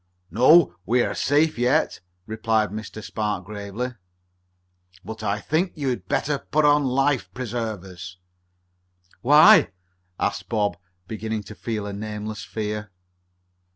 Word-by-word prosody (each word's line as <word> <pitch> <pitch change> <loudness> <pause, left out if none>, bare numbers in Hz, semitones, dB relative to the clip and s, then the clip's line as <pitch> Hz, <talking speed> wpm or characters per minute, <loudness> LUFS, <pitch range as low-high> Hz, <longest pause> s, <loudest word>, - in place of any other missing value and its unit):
"No, 140 +7 +6
we 120 +5 +2
are - - -2
safe 150 0 +1
yet," 130 +6 +1 0.3
replied 110 -1 0
Mr. 110 0 -7
Spark 105 -4 -3
gravely. 105 +4 -5 1.2
"But 110 0 -7
I 100 +1 -1
think 165 - -1
you 140 -4 -2
had 105 -8 -4
better 145 +6 0
put 155 +1 0
on 145 -1 +4
life 135 +1 +1
preservers." 105 -7 -5 1.0
"Why?" 155 - +7 0.5
asked - - -2
Bob, 105 -3 0 0.3
beginning 110 0 -4
to 110 - -10
feel 110 -2 -4
a 100 - -5
nameless 105 +1 -5
fear. 105 -1 -4
110 Hz, 120 wpm, -24 LUFS, 105-135 Hz, 1.2 s, Why